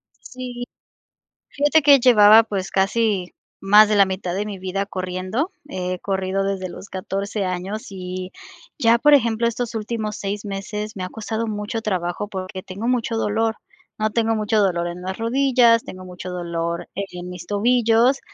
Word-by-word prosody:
Sí. 250 -1 -8 0.8
Fíjate 295 +2 +2
que 280 -1 +7
llevaba, 220 -3 +7
pues 195 -4 -4
casi 195 -1 0 0.3
más 210 +2 +6
de 215 - +2
la 200 -1 +6
mitad 185 -2 -3
de 205 +2 -2
mi 205 -2 -6
vida 190 +2 -3
corriendo, 185 - -3 0.2
he 185 -5 -3
corrido 195 0 -1
desde 195 -1 -2
los 200 - -10
14 200 +1 -3
años 185 +4 -4
y 185 -1 -6 0.5
ya, 235 -3 +4
por 295 +4 +4
ejemplo, 235 -3 +2
estos 235 0 -2
últimos 215 -1 -3
6 205 +1 -4
meses 210 +2 -5
me 185 - -3
ha - - -4
costado 220 +1 -3
mucho 215 +1 -4
trabajo 185 0 -2
porque 185 -1 -6
tengo 195 +5 -6
mucho 235 -2 0
dolor, 225 +1 0 0.4
¿no? 215 0 0
Tengo 225 0 +1
mucho 215 0 +1
dolor 175 -3 +1
en 175 +1 -7
las 190 +1 -5
rodillas, 240 -1 +3
tengo 185 0 -9
mucho 180 0 -8
dolor 170 -1 -3
en 180 -2 -6
mis 180 -1 -8
tobillos 235 +4 +3
205 Hz, 165 wpm, -22 LUFS, 185-230 Hz, 0.8 s, que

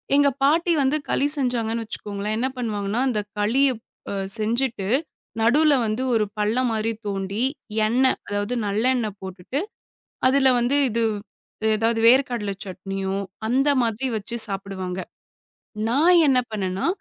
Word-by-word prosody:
எங்க 285 0 +5
பாட்டி 330 +5 +3
வந்து 270 +3 +2
களி 285 - +2
செஞ்சாங்கன்னு 230 -3 -1
வெச்சுக்கோங்களேன், 210 -1 -4
என்ன 255 - 0
பண்ணுவாங்கனா, 210 -2 -2
அந்தக் 210 -3 -3
களிய 260 +7 +3 0.4
அ 200 - -3 0.2
செஞ்சுட்டு 230 -2 -1 0.5
நடுவுல 290 +6 +4
வந்து 215 +4 -1
ஒரு 220 -2 +2
பள்ளம் 225 +5 +1
மாரி 220 +1 0
தோண்டி, 200 +3 -2 0.4
எண்ண 245 +4 +2 0.2
அதாவது 205 +3 -2
நல்லெண்ண 225 +3 +1
போட்டுட்டு, 190 +8 -5 0.7
அதுல 270 0 +4
வந்து 245 +4 +2
இது 230 +1 -1 0.7
ஏதாது 225 +1 +1
வேர்க்கடல 240 -5 +3
சட்னியோ, 195 0 -4 0.3
அந்த 270 +4 +2
மாதிரி 230 +3 -1
வச்சு 225 +3 -4
சாப்பிடுவாங்க. 190 -2 -4 0.9
நான் 320 +9 +4
என்ன 260 -2 +4
பண்ணேன்னா 190 -3 -2
225 Hz, 125 wpm, -23 LUFS, 205-260 Hz, 0.9 s, எங்க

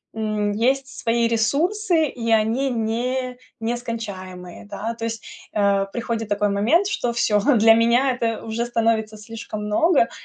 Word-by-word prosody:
м, 215 -1 -1
есть 265 +5 +1
свои 230 0 +1
ресурсы 320 - +1
и 235 -4 -5
они 225 +5 +2
не 250 +2 -2 0.2
нескончаемые, 210 -7 -5
да. 210 +3 -4
То 230 - -5
есть, 225 -1 -5 0.3
э, 200 -1 +2
приходит 230 -2 -3
такой 205 0 +1
момент, 240 - +2
что 245 -12 -1
всё, 215 -3 +2 0.2
для 225 +1 +7
меня 235 +4 +3
это 230 -3 -2
уже 225 +1 -2
становится 225 -2 0
слишком 215 -1 -7
много 255 +5 +3
230 Hz, 140 wpm, -22 LUFS, 215-245 Hz, 0.3 s, для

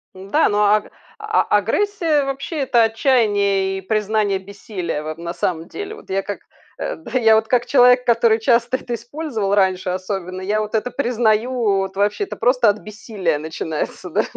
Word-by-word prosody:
Да, 195 +12 +1
ну, 205 0 0
аг 210 0 +2 0.3
а 430 0 +1
агрессия 310 - +1
вообще- 275 +3 -4
это 245 -4 +3
отчаянье 205 -5 +2
и 190 - -6
признание 210 0 0
бессилия, 190 -4 -5
вот, 155 +1 -6
на 170 +1 -5
самом 170 -1 -2
деле. 410 +1 -7
Вот 435 - -16
я 195 +1 0
как 200 +1 -6 0.4
да, 320 -5 -4
я 220 -1 +5
вот 220 0 +1
как 245 -1 +2
человек, 250 -1 +5
который 230 -1 +3
часто 235 +2 +2
это 245 -2 -6
использовал 235 -4 -3
раньше, 190 -2 +1
особенно, 185 0 -4
я 210 +3 0
вот 215 +1 -3
это 220 +3 0
признаю. 235 -2 +1 0.3
Вот 195 0 -3
вообще 205 - 0
это - - -7
просто 245 0 +2
от 205 - 0
бессилия 205 -6 -3
начинается, 160 +3 -5
да. - - +1
215 Hz, 170 wpm, -20 LUFS, 195-245 Hz, 0.4 s, я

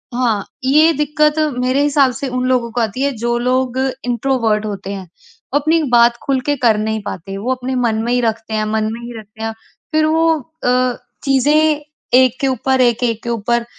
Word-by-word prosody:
हाँ, 230 -5 0 0.2
ये 305 +5 +5
दिक्कत 300 +1 +2 0.2
मेरे 255 +2 +1
हिसाब 280 -3 +3
से 280 - -3
उन 255 0 -2
लोगों 250 -2 +1
को 240 - -1
आती 225 +3 -2
है 280 0 +1
जो 235 +1 -1
लोग 255 +1 0 0.3
इंट्रोवर्ट 235 -3 0
होते 200 -2 -5
हैं, 190 -2 -7 0.5
अपनी 310 +3 +2
बात 235 0 +5
खुल 270 -1 0
के 290 - +2
कर 230 -4 +3
नहीं 220 0 -2
पाते, 195 +2 -6
वो 235 +6 -2
अपने 255 +1 -4
मन 235 -3 +1
में 240 - -1
ही 245 - +2
रखते 225 -1 -2
हैं, 215 0 0
मन 215 0 0
में 230 - -7
ही 235 -1 -8
रखते 215 +1 -11
हैं, 225 - -2 0.4
फ़िर 310 0 +2
वो 320 +1 +2 0.4
अ, 250 0 +1 0.3
चीज़ें 295 +3 +3 0.3
एक 255 0 +4
के 275 - +2
ऊपर 260 +1 +1
एक, 240 -1 +2
एक 230 -2 0
के 235 - -4
ऊपर 235 +1 0
245 Hz, 200 wpm, -17 LUFS, 225-270 Hz, 0.5 s, ये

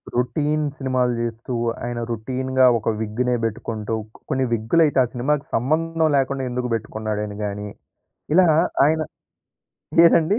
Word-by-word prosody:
Routine 145 +5 0
సినిమాలు 130 -2 0
చేస్తూ, 115 +2 -4 0.3
ఆయన 120 0 -3
రొటీన్‌గా 130 +3 +1
ఒక 110 - -2
విగ్‌నే 120 +3 0
పెట్టుకుంటూ, 110 0 -3 0.3
కొన్ని 130 0 +1
విగ్గులైతే 135 +6 +2
ఆ - - +1
సినిమాకి 140 +4 0
సంబంధం 160 +5 +1
లేకుండా 135 0 0
ఎందుకు 125 0 -2
పెట్టుకున్నాడు 110 -1 -3
అని 105 0 -8
గాని. 105 0 -4 0.7
ఇలా 180 -2 +6 0.4
ఆయన 160 +1 +2 1.1
ఏదండి? 170 +6 +3
125 Hz, 120 wpm, -22 LUFS, 115-150 Hz, 1.1 s, ఇలా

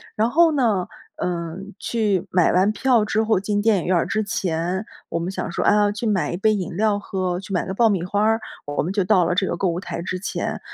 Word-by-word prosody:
然 220 +2 +2
后 330 +5 +5
呢， 225 -11 +1 0.4
嗯， 175 +3 -4
去 205 -6 0
买 180 -2 +3
完 185 +3 +3
票 235 0 +2
之 220 0 +1
后， 220 -3 +2
进 205 +1 -1
电 220 -1 +3
影 - - -5
院 185 - +2
儿 170 - +2
之 215 0 0
前， 185 0 -2 0.2
我 170 - -2
们 170 +2 -3
想 190 - -4
说， - - -2
啊， 205 0 +4
去 210 +3 -5
买 200 -4 0
一 175 - -3
杯 215 +3 +3
饮 185 -4 -4
料 210 +1 +2
喝， 185 -3 -2
去 195 +1 -8
买 180 - 0
个 190 - -3
爆 230 +1 +4
米 190 -5 0
花 200 +3 0
儿， 225 +1 +3 0.3
我 145 0 -1
们 170 - -2
就 200 0 +1
到 185 -1 +4
了 175 - 0
这 190 - +2
个 - - -1
购 185 +2 0
物 170 +1 -2
台 175 -2 -5
之 185 +1 -4
前。 195 - -3
195 Hz, 270 characters per minute, -22 LUFS, 180-215 Hz, 0.4 s, 后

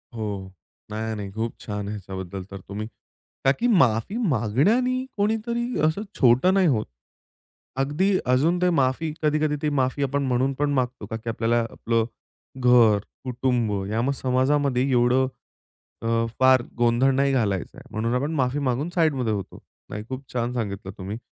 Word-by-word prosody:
हो, 100 -4 -4 0.4
नाही, 110 +1 -3
नाही. 100 -2 -6
खूप 115 +2 -3
छान 105 - -6
आहे - - -4
ह्याच्याबद्दल 95 -1 -6
तर 100 - -7
तुम्ही 105 +2 -5 0.6
का 135 - +6
की 245 - +2
माफी 165 - +3
मागण्याने 205 - +2
कोणीतरी 235 +4 -1
असं 160 +6 -1 0.2
छोटं 130 +9 +5
नाही 190 -3 +4
होत. 115 -7 +1 1.0
अगदी 150 +8 +1 0.2
अजून 160 +8 +3
ते 180 - +4
माफी, 150 0 +1
कधी-कधी 150 0 +2
ते 150 - +1
माफी 130 +2 0
आपण 140 +1 0
म्हणून 130 +2 +1
पण 145 0 +2
मागतो, 125 -4 -1
का 110 - -5
की 115 +1 -6
आपल्याला 115 +1 +1
आपलं 115 -1 0 0.6
घर, 120 -4 +6 0.3
कुटुंब 125 -3 0 0.2
या 120 +5 +1
समाजामध्ये 130 0 +2
एवढं 125 +2 +3 0.7
अ, 115 - -3 0.3
फार 130 -1 +6 0.2
गोंधळ 120 +3 +3
नाही 140 +1 +2
घालायचं 100 -8 -1
आहे, - - -11
म्हणून 115 +3 -1
आपण 140 +5 -1
माफी 130 +1 +1
मागून 135 +7 0
साइडमध्ये 140 -10 +2
होतो. 100 -2 -5 0.3
नाही, 105 - -5
खूप 130 +1 -5
छान 120 0 -1
सांगितलं 100 -5 -4
तुम्ही. 100 +3 -5
125 Hz, 155 wpm, -24 LUFS, 110-145 Hz, 1.0 s, का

